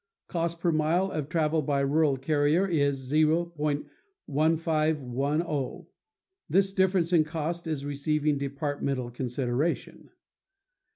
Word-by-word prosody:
Cost 170 Hz, -1 st, -2 dB
per 170 Hz, 0 st, +1 dB
mile 165 Hz, +5 st, +1 dB
of 150 Hz, -2 st, -3 dB
travel 160 Hz, -1 st, +1 dB
by 140 Hz, -1 st, 0 dB
rural 140 Hz, 0 st, +2 dB
carrier 150 Hz, +6 st, +2 dB
is 140 Hz, -5 st, 0 dB
$0.1510. 155 Hz, -, 0 dB, 0.6 s
This 195 Hz, 0 st, +3 dB
difference 190 Hz, -2 st, +2 dB
in 165 Hz, -2 st, +6 dB
cost 165 Hz, +2 st, -4 dB
is 150 Hz, -3 st, -3 dB
receiving 145 Hz, +1 st, 0 dB
departmental 140 Hz, -2 st, -2 dB
consideration. 125 Hz, +4 st, -2 dB
155 Hz, 100 wpm, -28 LUFS, 140-165 Hz, 0.6 s, in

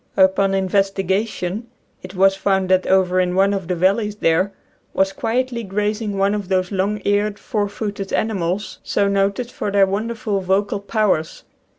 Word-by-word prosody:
Upon 190 Hz, +1 st, +4 dB
inves 195 Hz, +1 st, +1 dB
tigation 195 Hz, +1 st, -2 dB, 0.4 s
it 185 Hz, +1 st, -10 dB
was 195 Hz, +1 st, +4 dB
found 195 Hz, -1 st, 0 dB
that 185 Hz, 0 st, +3 dB
over 185 Hz, -1 st, +3 dB
in 180 Hz, 0 st, +1 dB
one 195 Hz, +1 st, +3 dB
of 190 Hz, -4 st, -3 dB
the 180 Hz, -, -1 dB
valleys 200 Hz, +4 st, +1 dB
there 185 Hz, 0 st, +1 dB, 0.4 s
was 190 Hz, 0 st, +2 dB
quietly 240 Hz, +3 st, -1 dB
grazing 210 Hz, +1 st, -2 dB
one 195 Hz, +1 st, +2 dB
of 205 Hz, -3 st, -4 dB
those 185 Hz, 0 st, 0 dB
long 200 Hz, +2 st, 0 dB
eared, 205 Hz, 0 st, +1 dB
four 205 Hz, -1 st, -2 dB
footed 205 Hz, -1 st, -5 dB
animals 195 Hz, -2 st, -2 dB
so 200 Hz, -, 0 dB
noted 200 Hz, +5 st, 0 dB
for -, -, -3 dB
their 200 Hz, -1 st, +4 dB
wonderful 215 Hz, +2 st, -2 dB
vocal 195 Hz, +2 st, 0 dB
powers. 200 Hz, -6 st, -1 dB
195 Hz, 165 wpm, -20 LUFS, 190-210 Hz, 0.4 s, Upon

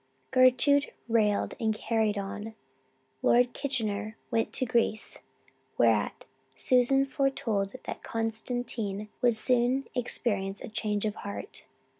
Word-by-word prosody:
Gertrude 255 Hz, +3 st, +4 dB, 0.2 s
rallied 215 Hz, -3 st, +2 dB
and 220 Hz, -2 st, +1 dB
carried 220 Hz, -1 st, 0 dB
on. 205 Hz, +2 st, -5 dB, 0.7 s
Lord 245 Hz, 0 st, +4 dB
Kitchener 215 Hz, -5 st, -2 dB
went 225 Hz, -1 st, +1 dB
to 255 Hz, -, +2 dB
Greece, 230 Hz, -2 st, 0 dB, 0.6 s
whereat -, -, +2 dB, 0.3 s
Susan 260 Hz, +2 st, +3 dB
foretold 260 Hz, -7 st, -1 dB
that -, -, -6 dB
Constantine 225 Hz, -2 st, -3 dB
would 240 Hz, -3 st, +4 dB
soon 250 Hz, +3 st, +2 dB
experience 205 Hz, -6 st, -2 dB
a -, -, -6 dB
change 210 Hz, -1 st, -1 dB
of 210 Hz, -, 0 dB
heart. 200 Hz, -, -7 dB
230 Hz, 110 wpm, -29 LUFS, 210-250 Hz, 0.7 s, Gertrude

